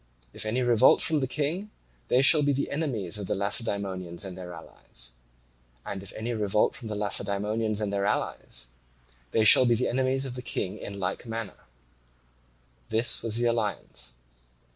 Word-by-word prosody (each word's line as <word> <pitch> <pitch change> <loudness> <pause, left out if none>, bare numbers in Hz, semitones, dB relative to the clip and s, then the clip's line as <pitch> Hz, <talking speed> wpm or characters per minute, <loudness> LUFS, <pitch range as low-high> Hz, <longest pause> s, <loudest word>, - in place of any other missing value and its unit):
If - - -4
any 125 +4 0
revolt 120 0 +5
from 160 -2 +2
the 130 - -1
King, 155 +10 -2 0.4
they 130 +2 +4
shall 150 +2 +7
be 145 -1 +2
the 140 +1 -2
enemies 115 - -2
of 100 - -5
the - - 0
Lacedaemonians 100 -4 -1
and 95 -2 -6
their 90 -1 -8
allies. 60 -7 -7 0.7
And 95 -1 -5
if 100 - -10
any 115 +2 -3
revolt 105 -2 +1
from 120 - -9
the 110 - -4
Lacedaemonians 105 +1 +1
and 105 -2 -2
their 100 0 0
allies, - - -2 0.6
they 110 - +2
shall 120 +4 +8
be 120 - +4
the 125 +3 0
enemies 130 +2 0
of 130 - -5
the 125 - -6
King 95 -6 -3
in 100 0 -7
like 95 +5 -3
manner. 115 -3 -5 1.2
This 115 +2 +1
was 115 -1 -1
the 120 - +1
alliance. 105 - -2
110 Hz, 170 wpm, -27 LUFS, 100-125 Hz, 1.2 s, shall